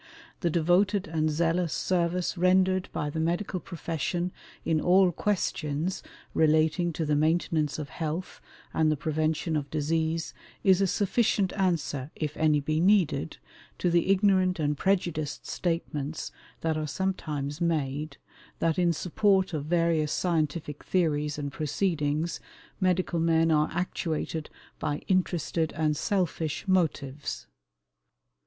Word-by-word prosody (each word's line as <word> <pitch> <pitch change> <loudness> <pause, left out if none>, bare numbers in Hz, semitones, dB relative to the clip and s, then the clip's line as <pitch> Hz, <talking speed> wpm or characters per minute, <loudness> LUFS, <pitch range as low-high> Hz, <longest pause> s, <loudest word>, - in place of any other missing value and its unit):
The 175 - +1
devoted 180 +5 +2
and 155 -1 0
zealous 165 +2 +1
service 180 0 0
rendered 185 +1 +3
by 145 0 -2
the 160 - -3
medical 175 +4 -1
profession 170 +1 -3 0.3
in 160 -2 +2
all 185 0 +5
questions 170 -3 -1 0.3
relating 160 +2 +3
to 160 - -2
the 150 0 +1
maintenance 155 -1 +1
of 150 -2 -5
health 165 +2 -4 0.3
and 155 -1 +3
the 155 - 0
prevention 155 +2 -1
of 145 -2 -2
disease 160 +2 -1 0.3
is 190 -1 +5
a 195 - +3
sufficient 205 0 +1
answer, 165 -8 -1
if 150 -2 -3
any 155 -2 +3
be 155 +2 -1
needed, 180 - +2 0.4
to 175 - +1
the 170 +2 +2
ignorant 190 -2 +3
and 150 -1 +1
prejudiced 165 -4 -1
statements 160 -3 -3 0.3
that 160 -1 0
are 155 -1 -2
sometimes 150 -4 -3
made, 155 -3 -1 0.4
that 165 0 +1
in 175 -1 +3
support 190 +3 +2
of 145 -2 -2
various 165 -2 +1
scientific 155 -3 -1
theories 150 -5 0
and 145 -1 -4
proceedings 155 0 -1 0.4
medical 185 -2 +1
men 165 0 +3
are 150 -1 +3
actuated 165 -2 -2 0.3
by 145 0 -2
interested 175 -4 0
and 155 -1 +1
selfish 170 -2 -1
motives. 150 - -1
165 Hz, 125 wpm, -28 LUFS, 150-180 Hz, 0.4 s, all